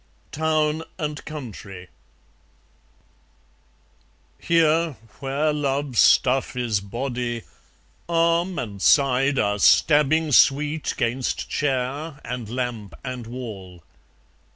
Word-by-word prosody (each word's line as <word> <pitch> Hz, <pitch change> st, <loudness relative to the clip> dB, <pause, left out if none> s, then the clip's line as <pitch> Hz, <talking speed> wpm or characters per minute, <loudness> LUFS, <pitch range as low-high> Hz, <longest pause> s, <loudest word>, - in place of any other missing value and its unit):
Town 155 Hz, 0 st, 0 dB, 0.2 s
and 150 Hz, -1 st, -4 dB
Country 105 Hz, -, -9 dB, 2.5 s
Here, 165 Hz, -1 st, +2 dB, 0.3 s
where 140 Hz, +3 st, 0 dB
love's 140 Hz, -3 st, -1 dB
stuff 130 Hz, 0 st, +4 dB
is 120 Hz, -5 st, 0 dB
body, 120 Hz, +3 st, -4 dB, 0.7 s
arm 170 Hz, +2 st, +1 dB
and 100 Hz, -5 st, -5 dB
side 135 Hz, -, +3 dB
Are 105 Hz, -2 st, +1 dB
stabbing 150 Hz, +5 st, +4 dB
sweet 145 Hz, +4 st, +3 dB
'gainst 120 Hz, +2 st, -1 dB
chair 140 Hz, +2 st, -2 dB
and 120 Hz, -2 st, -5 dB
lamp 120 Hz, -4 st, -4 dB
and 125 Hz, -3 st, -6 dB
wall. 100 Hz, -8 st, -8 dB
135 Hz, 85 wpm, -23 LUFS, 120-150 Hz, 2.5 s, stuff